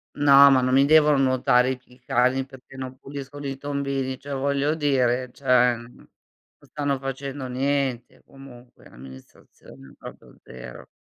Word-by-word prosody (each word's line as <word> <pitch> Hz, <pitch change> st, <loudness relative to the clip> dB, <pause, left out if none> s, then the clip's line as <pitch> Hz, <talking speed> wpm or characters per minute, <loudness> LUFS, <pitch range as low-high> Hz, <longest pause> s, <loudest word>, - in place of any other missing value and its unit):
No, 140 Hz, -1 st, +7 dB
ma 130 Hz, -1 st, +4 dB
non 130 Hz, +1 st, +1 dB
mi 135 Hz, +1 st, +5 dB
devono 150 Hz, -1 st, +4 dB
nuotare, 130 Hz, -1 st, +2 dB
i 130 Hz, -, -4 dB
p 125 Hz, -, -37 dB
i 125 Hz, +1 st, -21 dB
cani 130 Hz, +2 st, 0 dB
perché 135 Hz, 0 st, -16 dB
non 130 Hz, -1 st, -7 dB
puliscono 140 Hz, 0 st, -8 dB
i 135 Hz, 0 st, -5 dB
tombini, 140 Hz, -2 st, -4 dB
cioè 140 Hz, 0 st, -8 dB
voglio 140 Hz, +2 st, -1 dB
dire 130 Hz, -4 st, 0 dB
cioè 125 Hz, -2 st, +2 dB
mhmm, 120 Hz, +1 st, -13 dB
non -, -, -20 dB, 0.5 s
stanno 145 Hz, -2 st, -3 dB
facendo 135 Hz, 0 st, -6 dB
niente, 130 Hz, -1 st, -2 dB
comunque, 125 Hz, -3 st, -16 dB
l'amministrazione 65 Hz, +1 st, -16 dB
proprio -, -, -13 dB
0. 65 Hz, -1 st, -11 dB
135 Hz, 150 wpm, -23 LUFS, 125-140 Hz, 0.5 s, No